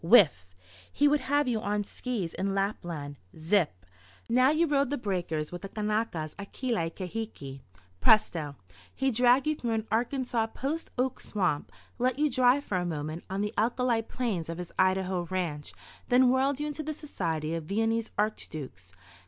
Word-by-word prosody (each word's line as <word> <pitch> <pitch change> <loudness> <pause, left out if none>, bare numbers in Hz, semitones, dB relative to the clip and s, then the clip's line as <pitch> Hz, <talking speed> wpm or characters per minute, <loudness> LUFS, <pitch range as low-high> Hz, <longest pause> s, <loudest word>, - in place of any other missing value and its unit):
Whiff! 165 - +6 0.4
He 290 - +3
would 295 +1 +4
have 285 +2 +1
you 230 -3 0
on 210 0 0
skis 205 -6 -4
in 195 +1 -1
Lapland. 170 -8 -2 0.2
Zip! 160 - +1 0.4
Now 255 +3 +5
you 310 +3 +3
rode 280 -4 +2
the 290 - -1
breakers 175 -8 -2
with 175 - -6
the 195 - -6
Kanakas 210 -7 -1
at 200 - -7
Kealaikahiki. 185 - -3 0.4
Presto! 165 - +3 0.4
He 270 0 +1
dragged 245 +3 +4
you 305 0 +1
through 235 -5 -2
an 220 0 -1
Arkansas 240 0 0
post 285 +8 -3
oak 255 +1 0
swamp, 180 -8 -1 0.3
let 255 +1 +1
you 300 0 +2
dry 250 +2 +5
for 205 -10 -2
a - - -1
moment 155 0 -4
on 195 +1 -1
the 210 +1 -2
alkali 235 +1 +2
plains 220 -8 -3
of 165 - -4
his 180 -1 -6
Idaho 185 -1 +2
ranch, 170 -6 -2 0.4
then 250 +1 +6
whirled 265 +2 +2
you 295 - -1
into 300 +1 -3
the 310 0 -4
society 165 - -3
of 165 -2 -3
Viennese 225 +4 0
archdukes. 150 - -3
215 Hz, 165 wpm, -29 LUFS, 170-255 Hz, 0.4 s, Whiff